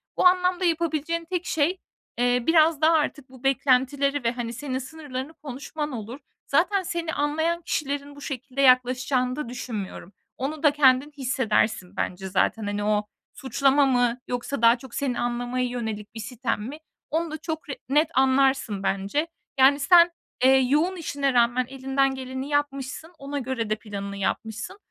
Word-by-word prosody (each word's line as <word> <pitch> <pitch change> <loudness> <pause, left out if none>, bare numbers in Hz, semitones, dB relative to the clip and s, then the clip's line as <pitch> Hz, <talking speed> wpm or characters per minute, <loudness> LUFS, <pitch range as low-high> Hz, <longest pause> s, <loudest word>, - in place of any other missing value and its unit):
o - - +1
anlamda 360 0 +4
yapabileceğin 335 0 0
tek 360 +1 -3
şey, 325 +5 0 0.4
eee, 245 0 +2
biraz 320 -2 +4
daha 320 +1 +5
artık 290 -3 0
bu 260 0 -16
beklentileri 270 +1 +2
ve, 230 - +2
hani, 240 -1 -4
senin 260 +1 -3
sınırlarını 285 0 -7
konuşman 295 +2 -6
olur. 235 +3 -6 0.3
Zaten 370 +6 +2
seni 335 -2 -3
anlayan 315 +4 0
kişilerin 285 -2 -3
bu 285 - -12
şekilde 270 -1 -4
yaklaşacağını 255 0 +3
da 300 -6 -5
düşünmüyorum. 210 -6 -6 0.2
Onu 290 +4 -4
da 295 - +6
kendin 280 0 +4
hissedersin 225 -7 0
bence 190 +1 -3
zaten. 215 +4 +1
Hani, 205 0 -2
o, 210 0 +1 0.3
suçlama 275 +1 +2
mı 245 -2 +2
yoksa 245 +1 -3
daha 230 +1 +6
çok 240 0 -12
seni 265 -3 -1
anlamaya 245 +1 -1
yönelik 220 -4 -5
bir 225 - -6
sitem 230 0 -3
mi? 265 +8 -6 0.3
Onu 325 0 -1
da 310 - -4
çok 315 -1 -5
re 275 - -4
net 295 +3 +4
anlarsın 265 -6 +2
bence. 200 +11 0 0.3
Yani 280 +2 +6
sen, 345 +3 +6 0.3
eee, 260 - +7
yoğun 300 +8 +2
işine 285 -5 -1
rağmen 240 +1 +3
elinden 270 0 0
geleni 260 +1 -5
yapmışsın. 290 +2 -2
Ona 280 +1 -4
göre 245 -4 -3
de 215 - +2
planını 200 -2 -6
yapmışsın. 220 - -3
265 Hz, 160 wpm, -25 LUFS, 245-295 Hz, 0.4 s, eee